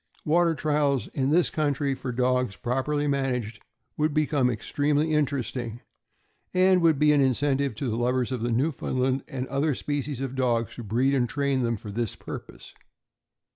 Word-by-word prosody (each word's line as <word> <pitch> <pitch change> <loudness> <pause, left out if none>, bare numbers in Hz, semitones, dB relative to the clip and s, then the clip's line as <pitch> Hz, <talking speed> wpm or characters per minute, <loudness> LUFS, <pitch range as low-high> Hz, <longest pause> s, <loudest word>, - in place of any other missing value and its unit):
Water 170 +1 +3
trials 145 -3 0
in 135 0 -1
this 170 +3 +3
country 145 -2 0
for 130 -1 -5
dogs, 125 -3 +1
properly 135 +4 -1
managed, 125 -6 -1 0.4
would 155 -1 0
become 145 -4 +2
extremely 145 +6 0
interesting, 125 -5 -1 0.7
and 185 0 +5
would 165 -3 +4
be 150 +1 +4
an 145 - +4
incentive 135 -1 +1
to 130 +4 -3
the 110 - -1
lovers 125 +1 0
of 125 -3 -2
Newfoundland 130 +1 0
and 130 -1 -4
other 140 +1 0
species 145 -1 -3
of 135 -1 -3
dogs 120 -4 0
to 120 - -6
breed 120 +6 +1
and 125 -3 +1
train 140 -1 0
them 115 -2 0
for 105 +1 -8
this 115 0 -2
purpose. - - -9
135 Hz, 160 wpm, -26 LUFS, 125-145 Hz, 0.7 s, and